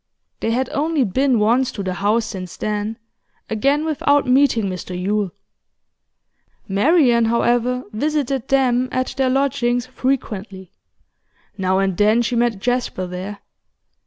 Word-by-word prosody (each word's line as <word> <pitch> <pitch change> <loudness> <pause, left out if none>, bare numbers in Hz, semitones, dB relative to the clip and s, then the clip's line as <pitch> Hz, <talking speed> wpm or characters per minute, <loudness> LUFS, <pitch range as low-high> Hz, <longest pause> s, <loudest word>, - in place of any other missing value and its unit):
They - - -1
had 250 +3 0
only 305 0 +1
been 255 +4 +1
once 235 +5 +2
to 200 - -5
the 185 -1 -2
house 210 +5 +1
since 185 -4 -7
then, 210 +1 -3 0.5
again 275 +8 +1
without 290 -2 +2
meeting 255 -4 +3
Mr 180 -1 -5
Yule. 205 +1 0 1.4
Marian, 240 - +3
however, 240 +2 +1
visited 275 0 -1
them 255 -2 +2
at 255 0 -1
their 265 -1 +1
lodgings 255 -2 +1
frequently; 210 -8 -3 0.8
now 190 -1 0
and 195 -1 +1
then 215 +5 +3
she 235 +2 -1
met 235 -2 +1
Jasper 245 -3 -1
there. 185 +3 -7
235 Hz, 130 wpm, -20 LUFS, 205-265 Hz, 1.4 s, meeting